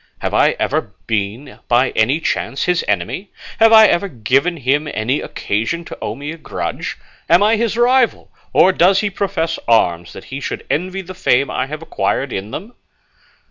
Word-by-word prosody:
Have - - -2
I - - +3
ever - - -2
been 110 +6 -3
by 125 +2 +3
any 125 +8 +2
chance 140 -3 -2
his 180 -1 +1
enemy? 105 - -2 0.3
Have 225 0 +6
I 220 -1 +9
ever 200 0 +2
given 135 - 0
him 145 +2 0
any 110 +6 -1
occasion 115 +12 -3
to - - -9
owe - - -3
me 145 +4 -6
a 165 - -8
grudge? - - -5 0.3
Am 175 +4 +5
I 215 +2 +4
his 230 0 -1
rival, 245 0 +2 0.2
or 190 - +5
does 190 +2 +4
he 205 -1 -1
profess 190 -4 -2
arms, 85 -7 +2
that - - -10
he 135 - -7
should - - -5
envy 185 +4 -2
the 185 +1 -9
fame 140 -7 +1
I 130 - -2
have 155 +3 -7
acquired 140 -4 -2
in 95 +2 -4
them?" 205 - -7
155 Hz, 180 wpm, -18 LUFS, 125-190 Hz, 0.3 s, I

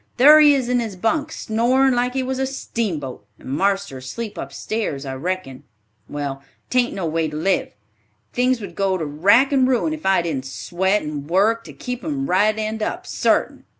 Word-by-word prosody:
Thar 295 +5 +8
he 295 -2 +7
is 260 -3 -1
in 250 0 +2
his 225 -5 -4
bunk, 285 - -1
snorin' 250 +4 +2
like 245 +1 0
he 265 - 0
was 260 0 -3
a 265 - 0
steamboat; 195 - -4
and - - -11
marster's 190 -3 -1
asleep 225 - -5
upstairs, 140 +1 -4
I 135 - -4
reckon. 145 -2 -4 0.5
Well, 140 -2 -4 0.3
'tain't 250 -1 +2
no 190 - -3
way 160 0 0
to 150 - -7
live. 190 - 0 0.6
Things 250 0 +2
would 195 -4 -7
go 195 +1 0
to 165 - -3
rack 200 - +4
and 265 -2 +3
ruin 260 +5 +1
if 315 - -7
I 190 -2 +3
didn't 135 -6 -3
sweat 190 +8 -1
and 150 -1 -6
work 215 +6 +2
to - - -9
keep 250 -1 -6
'em 285 -3 -2
right 210 +4 +2
end 220 0 -3
up, 360 +11 -3
sartin." - - 0
210 Hz, 190 wpm, -21 LUFS, 160-250 Hz, 0.6 s, Thar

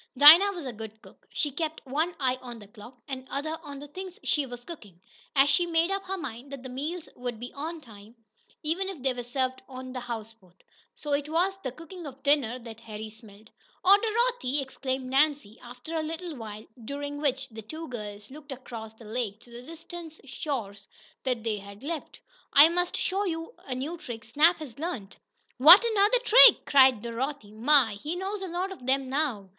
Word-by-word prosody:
Dinah 325 +8 +10
was 345 -6 -7
a 255 - -4
good 220 0 -9
cook. - - -18
She 295 - -2
kept 315 +2 -4
one 310 +6 -1
eye 255 -2 +1
on 240 -2 -8
the 210 - -12
clock 215 +4 -14
and 260 -1 -6
the - - -21
other 310 +3 -3
on 285 -1 -9
the 290 +1 -9
things 370 +4 -8
she 290 -3 +1
was 245 -1 -9
cooking. 210 - -11 0.4
And 275 0 +6
she 345 +5 +3
made 335 +2 +2
up 390 0 -1
her 385 +1 -3
mind 265 -4 -7
that 275 -2 -7
the 260 - -7
meals 300 +7 -4
would 245 -2 -5
be 245 +1 -8
on 320 +3 -5
time, 215 -2 -15 0.5
even 350 +5 -1
if 335 -10 -8
they 265 -1 +2
were 245 - -5
served 260 +1 -2
on 255 0 -8
a - - -2
houseboat. 225 -6 -9 0.3
So 295 -1 -4
it 285 +1 0
was 355 +5 +1
the 260 - -3
cooking 330 +4 -10
of 270 0 -11
dinner 280 -5 +2
that 230 -3 -10
Harry 220 -1 -8
smelled. 215 -1 -15 0.3
"Oh, 390 +2 +9
Dorothy!" 455 - 0
exclaimed 265 -1 -3
Nan, 280 +3 +3 0.2
after 245 +6 -10
a 320 - 0
little 325 +1 -5
while, 215 -3 -8 0.2
during 285 +3 -5
which 270 -2 0
the 220 -1 -9
two 315 +9 -8
girls 210 -2 -8
looked 295 +1 -11
across 230 -4 -8
the 225 - -15
lake 215 -2 -3
to 240 - -18
the 235 +1 -9
distant 330 +2 -10
shores 210 -9 -5 0.3
they 230 -5 -1
had 200 +3 -12
left. 315 0 -5 0.3
"I 295 +3 +9
must 355 +1 0
show 390 +1 0
you 330 +2 -4
a 255 - -3
new 305 +7 -4
trick 230 -5 -7
Snap 305 +10 +4
has 285 -5 -10
learned." 255 - -5 0.4
"What! 340 - +10
Another 440 +2 +4
trick?" - - +8
cried 260 -5 +5
Dorothy. 235 -1 -4
"My! 230 -2 +4
He 315 +4 -3
knows 385 +2 -4
a 380 - -4
lot 360 +3 -3
of 365 -10 -10
them 270 0 +2
now. 260 -8 -1
270 Hz, 200 wpm, -28 LUFS, 235-325 Hz, 0.5 s, Dinah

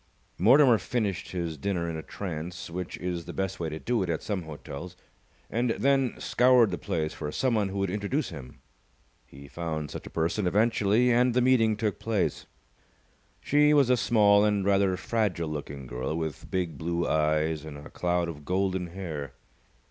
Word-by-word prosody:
Mortimer 125 - +6
finished 100 -2 -2
his 85 -4 -3
dinner 85 +1 -1
in 85 - -3
a 80 - -4
trance, 85 +1 -6
which 90 +1 -5
is 90 -2 -4
the - - -7
best 95 0 -3
way 85 -2 -2
to 80 - -5
do 120 +7 -1
it 90 - -2
at 80 - -2
some 100 -3 -2
hotels, 80 +3 -8 0.5
and 120 +1 0
then 135 +1 +2
scoured 125 -3 +4
the 90 - -3
place 80 -1 -2
for 75 - -5
someone 110 -4 +1
who 100 - -5
would 100 -2 0
introduce 105 +9 -1
him. 70 -7 -10 0.7
He 70 +1 -13
found 80 -1 -4
such - - -7
a - - -8
person 85 +4 -1
eventually 110 +3 +3
and 120 0 +3
the 125 - +4
meeting 115 -4 +3
took 105 -2 -1
place. 110 -4 -1 0.9
She 150 +1 +4
was 135 -4 +4
a - - +6
small 105 -4 +4
and 105 -2 +1
rather 100 -2 +3
fragile 95 -7 -1
looking 70 -2 -6
girl, 65 +4 -3
with 80 -3 -5
big 85 -6 -2
blue 85 +1 -1
eyes 75 0 +1
and 75 -2 -8
a 75 - -11
cloud 90 -1 0
of 75 -3 -7
golden 95 +1 -1
hair. 80 -7 -6
90 Hz, 180 wpm, -28 LUFS, 80-110 Hz, 0.9 s, Mortimer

